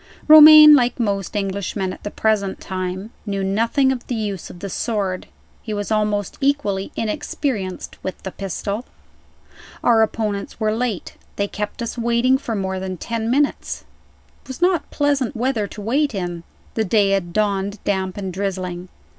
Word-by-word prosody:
Romayne, 305 0 +11
like 250 -3 +3
most 200 -3 -1
Englishmen 195 -1 -2
at - - -12
the 205 - -4
present 205 -3 0
time, 185 +2 -4 0.2
knew 200 -1 -2
nothing 230 +7 +2
of 250 -2 -5
the 245 - -2
use 205 -5 -4
of - - -11
the 200 - -6
sword. 195 -2 -2 0.3
He 215 -2 -4
was 205 +1 -4
almost 210 -2 0
equally 270 -9 0
inexperienced 220 -4 -3
with 185 - -5
the 190 - -5
pistol. 200 +4 -4 1.0
Our 230 -2 +5
opponents 215 -2 -2
were 215 -1 +1
late. 230 -5 -3 0.2
They 200 - -1
kept 210 +4 -5
us 235 +1 -5
waiting 235 +3 +2
for 230 -5 -4
more 190 -1 -2
than 185 -1 -5
ten 230 +4 -3
minutes. 285 +3 0 0.6
It - - -25
was 260 - -7
not 355 -1 +1
pleasant 285 -3 0
weather 235 -3 0
to 210 - -9
wait 265 +4 0
in. 175 -3 -4 0.3
The 220 - 0
day 205 -1 +2
had 190 -3 0
dawned 200 0 0
damp 190 -2 -1
and 190 -2 -4
drizzling. 185 -2 -4
210 Hz, 165 wpm, -21 LUFS, 195-240 Hz, 1.0 s, Romayne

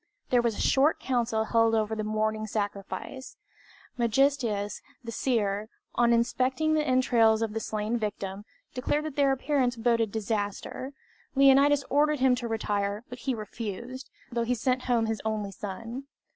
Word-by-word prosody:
There 245 -1 +5
was 235 -3 0
a - - -2
short 285 +4 +3
council 235 -3 0
held 225 0 +3
over 220 0 0
the 215 - -2
morning 215 0 -1
sacrifice. 205 +5 -5 0.6
Megistias, 235 -4 +1 0.2
the 230 - -6
seer, 215 -4 0 0.2
on 240 -1 +3
inspecting 255 +6 +2
the 310 - +3
entrails 235 -5 +3
of 220 -2 -2
the 225 - -1
slain 220 +2 -2
victim, 200 -2 -4 0.3
declared 295 +3 -1
that 310 -3 -5
their 280 -2 +3
appearance 270 -2 +1
boded 230 -2 +1
disaster. 220 +5 -3 0.4
Leonidas 275 +1 +6
ordered 295 +1 +3
him 260 -1 +4
to 245 -1 -2
retire, 205 -1 -1
but 245 0 -8
he 260 +1 -1
refused, 230 +4 -6 0.2
though 235 0 -1
he 245 +2 0
sent 255 +2 0
home 235 -3 +2
his 220 -1 -2
only 215 -2 -2
son. 225 +7 -6
230 Hz, 155 wpm, -28 LUFS, 215-260 Hz, 0.6 s, Leonidas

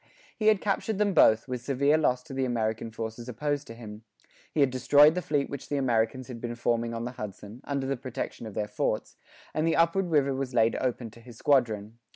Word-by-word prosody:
He 215 - -1
had 215 -3 +5
captured 210 +1 -1
them 205 -1 +2
both, 110 -9 +5
with 125 -2 -4
severe 140 +3 +2
loss 125 -5 +1
to 135 - -10
the 135 0 -1
American 115 -2 -1
forces 115 +2 -6
opposed 145 +4 -2
to 115 - -9
him; 110 -2 -10 0.5
he 150 - +1
had 135 -2 +4
destroyed 145 +4 +6
the 180 - -2
fleet 145 -4 0
which 140 -1 -7
the 145 - 0
Americans 125 -1 0
had 120 -3 -8
been 120 -1 -4
forming 115 0 -1
on 115 +1 -3
the 125 - -4
Hudson, 105 0 -8
under 140 -2 -2
the 135 +1 -1
protection 125 -2 -5
of 105 - -9
their 105 - -1
forts; 105 - -2 0.4
and 155 +1 0
the 165 - +2
upward 170 +2 +2
river 140 -4 +2
was 130 -1 -4
laid 115 -1 +3
open 120 -3 -2
to 115 - -16
his 120 -1 -13
squadron. 115 -6 +1
125 Hz, 220 wpm, -28 LUFS, 115-145 Hz, 0.5 s, destroyed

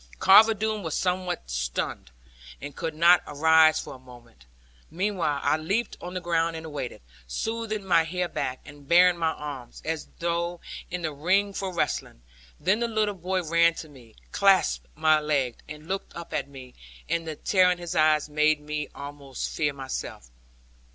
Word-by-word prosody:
Carver 220 - +7
Doone 215 0 -2
was 160 -5 -3
somewhat 180 - -2
stunned, - - -3 0.5
and 145 - -8
could 160 -2 -4
not 170 +3 +6
arise 160 +1 +5
for - - -7
a 130 - -12
moment. 120 - -17 0.4
Meanwhile 175 -5 -1
I - - +2
leaped 200 +9 -2
on 180 +1 -7
the - - -1
ground 165 -1 0
and 160 0 -7
awaited, 145 - -6 0.2
smoothing 220 - -3
my 170 -3 +4
hair 180 +2 -2
back, 130 -6 -4
and 145 -1 -14
baring 175 +1 +5
my 160 -1 +1
arms, 140 -5 -8
as 160 -1 -3
though 170 +1 -2 0.3
in 180 0 -4
the 155 -2 -2
ring 190 +7 +1
for 195 -1 -3
wrestling. 115 - -3 0.4
Then 205 +4 +2
the 235 - 0
little 215 -2 0
boy 185 0 -2
ran 170 +1 +3
to 160 - -8
me, 125 -6 -17 0.2
clasped 65 - +3
my 155 0 +4
leg, 140 -5 -1
and 150 +1 -10
looked 195 +1 -4
up 170 0 -8
at - - -2
me, 130 -2 -12 0.3
and 165 -1 -1
the 155 - -4
terror 185 +3 +3
in 180 - -1
his 175 0 -6
eyes 155 -1 +3
made 150 0 +2
me 150 0 -4
almost 140 -2 -6
fear 150 -2 +1
myself. 130 - -6
160 Hz, 175 wpm, -26 LUFS, 145-180 Hz, 0.5 s, Carver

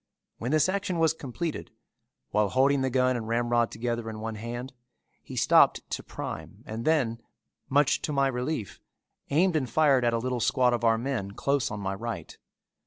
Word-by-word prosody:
When 120 - -3
this 155 +2 +3
action 190 -1 -1
was 160 -1 +3
completed, 150 +2 -5 0.6
while 105 -1 +2
holding 135 +4 +3
the 130 - +1
gun 130 0 +2
and 115 -2 -4
ramrod 120 0 +1
together 115 0 -3
in 110 -1 -7
one 110 +1 -4
hand, 120 +4 -6 0.5
he - - -10
stopped - - +4
to - - -2
prime - - -7
and 110 +2 -5
then, 125 -8 +1 0.5
much 145 +1 +3
to - - -3
my 140 -1 +2
relief, 125 - -3 0.5
aimed 170 +5 +3
and 135 -5 0
fired 140 -1 +4
at 120 - +3
a - - +2
little 125 +1 -2
squad 125 +1 +3
of 120 - -1
our 115 -1 +4
men 115 -5 -3
close 140 0 0
on 105 -1 -5
my 95 0 -2
right. 115 +4 -6
125 Hz, 180 wpm, -27 LUFS, 115-140 Hz, 0.6 s, stopped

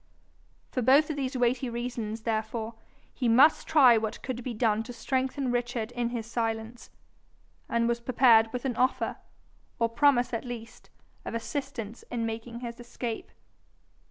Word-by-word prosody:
For 255 - -1
both 280 +6 +5
of - - -3
these 270 -2 -2
weighty 245 +1 +1
reasons 235 -2 -4
therefore 220 0 -2 0.4
he 250 - -1
must 270 +8 +5
try 260 -7 +6
what 220 -1 -4
could 250 -2 -4
be 250 - -3
done 220 -1 +2
to 245 +2 -8
strengthen 260 +2 -1
Richard 240 -2 -2
in 245 -1 -1
his 235 -2 -4
silence, 225 0 -3 0.8
and 235 0 +1
was 235 0 0
prepared 235 -2 +5
with 250 +1 -4
an 250 -3 -1
offer, 255 +1 +1 0.6
or 230 0 +1
promise 250 0 +3
at 230 - -2
least, 240 -2 -9 0.3
of - - -5
assistance 235 -2 -5
in 235 -2 -2
making 230 +1 -5
his 235 -1 -6
escape. 240 -1 -5
240 Hz, 155 wpm, -28 LUFS, 225-255 Hz, 0.8 s, try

